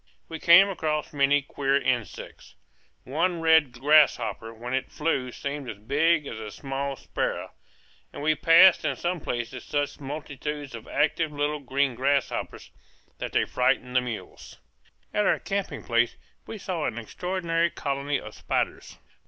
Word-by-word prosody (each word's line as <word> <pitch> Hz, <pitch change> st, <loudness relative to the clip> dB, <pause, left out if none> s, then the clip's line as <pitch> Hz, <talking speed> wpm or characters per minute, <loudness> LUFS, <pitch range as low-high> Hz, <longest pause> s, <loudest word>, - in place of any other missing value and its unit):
We 160 Hz, -1 st, -7 dB
came 175 Hz, +5 st, +7 dB
across 155 Hz, -6 st, -2 dB
many 140 Hz, 0 st, +3 dB
queer 140 Hz, 0 st, 0 dB
insects. 120 Hz, -, -4 dB, 0.5 s
One 170 Hz, +6 st, 0 dB
red 160 Hz, -4 st, +4 dB
grasshopper 140 Hz, -6 st, +3 dB
when 120 Hz, +2 st, -7 dB
it 130 Hz, 0 st, -2 dB
flew 140 Hz, -5 st, -1 dB
seemed 140 Hz, 0 st, -5 dB
as 105 Hz, -, -6 dB
big 150 Hz, +8 st, +2 dB
as 115 Hz, -, -6 dB
a 110 Hz, -1 st, -6 dB
small 135 Hz, +3 st, -4 dB
sparrow; -, -, -3 dB, 0.6 s
and -, -, -8 dB
we 155 Hz, +1 st, +3 dB
passed 165 Hz, +4 st, +6 dB
in -, -, 0 dB
some 175 Hz, 0 st, -2 dB
places 120 Hz, -2 st, -4 dB
such 145 Hz, -1 st, -2 dB
multitudes 145 Hz, 0 st, -6 dB
of 115 Hz, -2 st, -9 dB
active 155 Hz, +2 st, +1 dB
little 150 Hz, +1 st, -1 dB
green 135 Hz, 0 st, 0 dB
grasshoppers 140 Hz, +2 st, -1 dB, 0.5 s
that -, -, -4 dB
they -, -, +2 dB
frightened 125 Hz, 0 st, 0 dB
the 125 Hz, -, +5 dB
mules. 120 Hz, -3 st, -8 dB, 0.6 s
At 210 Hz, -, +2 dB
our -, -, +3 dB
camping 195 Hz, -7 st, -4 dB
place 120 Hz, 0 st, +1 dB, 0.3 s
we 225 Hz, -, -6 dB
saw 180 Hz, -6 st, -3 dB
an 120 Hz, -, -3 dB
extraordinary 170 Hz, -, -1 dB
colony 140 Hz, -1 st, -2 dB
of -, -, -10 dB
spiders. -, -, -3 dB
145 Hz, 150 wpm, -26 LUFS, 130-160 Hz, 0.6 s, came